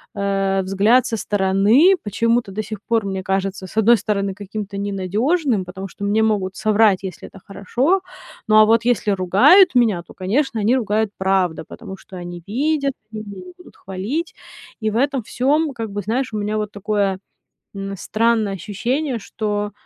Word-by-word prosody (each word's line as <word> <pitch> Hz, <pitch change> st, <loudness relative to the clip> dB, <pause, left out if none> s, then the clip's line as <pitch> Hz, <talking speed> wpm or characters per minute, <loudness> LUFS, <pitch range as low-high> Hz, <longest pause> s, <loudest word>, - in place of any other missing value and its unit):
э, 195 Hz, -1 st, 0 dB
взгляд 205 Hz, +7 st, +3 dB
со 225 Hz, -, -2 dB
стороны, 205 Hz, -, +3 dB
почему-то, 230 Hz, +1 st, 0 dB
до 215 Hz, -, -3 dB
сих 215 Hz, -1 st, -7 dB
пор 225 Hz, -3 st, 0 dB
мне 190 Hz, -1 st, -3 dB
кажется, 195 Hz, 0 st, -2 dB
с -, -, -14 dB
одной 230 Hz, +2 st, +5 dB
стороны, 200 Hz, -1 st, -2 dB
каким-то 205 Hz, 0 st, -7 dB
ненадежным, 205 Hz, -, 0 dB
потому 190 Hz, +2 st, -7 dB
что 200 Hz, +3 st, -7 dB
мне 215 Hz, +2 st, +2 dB
могут 195 Hz, -4 st, 0 dB
соврать, 215 Hz, -3 st, +3 dB
если 185 Hz, -3 st, -7 dB
это 195 Hz, -, -14 dB
хорошо. 250 Hz, -, 0 dB, 0.5 s
Ну, 215 Hz, -, +3 dB
а 215 Hz, -, +9 dB
вот 230 Hz, +1 st, +3 dB
если 220 Hz, -4 st, +1 dB
ругают 255 Hz, -, +5 dB
меня, 215 Hz, -8 st, +3 dB
то, -, -, -13 dB
конечно, 230 Hz, +6 st, -1 dB
они 230 Hz, +5 st, +3 dB
ругают, 215 Hz, -3 st, 0 dB
правда, 190 Hz, -4 st, 0 dB
потому 190 Hz, -, -9 dB
что 190 Hz, -, -14 dB
они 175 Hz, -1 st, -7 dB
видят, 280 Hz, +4 st, 0 dB, 0.2 s
они 215 Hz, 0 st, -5 dB
меня 205 Hz, -, -9 dB
не 360 Hz, -, -12 dB
будут 360 Hz, -, -17 dB
хвалить. 215 Hz, -, -4 dB, 0.5 s
И 220 Hz, -, 0 dB
в 220 Hz, -, -2 dB
этом 275 Hz, -2 st, 0 dB
всём, 285 Hz, +6 st, 0 dB
как 225 Hz, -2 st, -5 dB
бы, 205 Hz, -, -3 dB
знаешь, 240 Hz, +4 st, -2 dB
у 215 Hz, -, -2 dB
меня 210 Hz, +1 st, -2 dB
вот 210 Hz, -1 st, -3 dB
такое, 200 Hz, -2 st, -1 dB, 0.6 s
м, 195 Hz, 0 st, -5 dB
странное 220 Hz, +1 st, 0 dB
ощущение, 240 Hz, -, -2 dB
что 210 Hz, 0 st, -3 dB
210 Hz, 175 wpm, -20 LUFS, 195-235 Hz, 0.6 s, а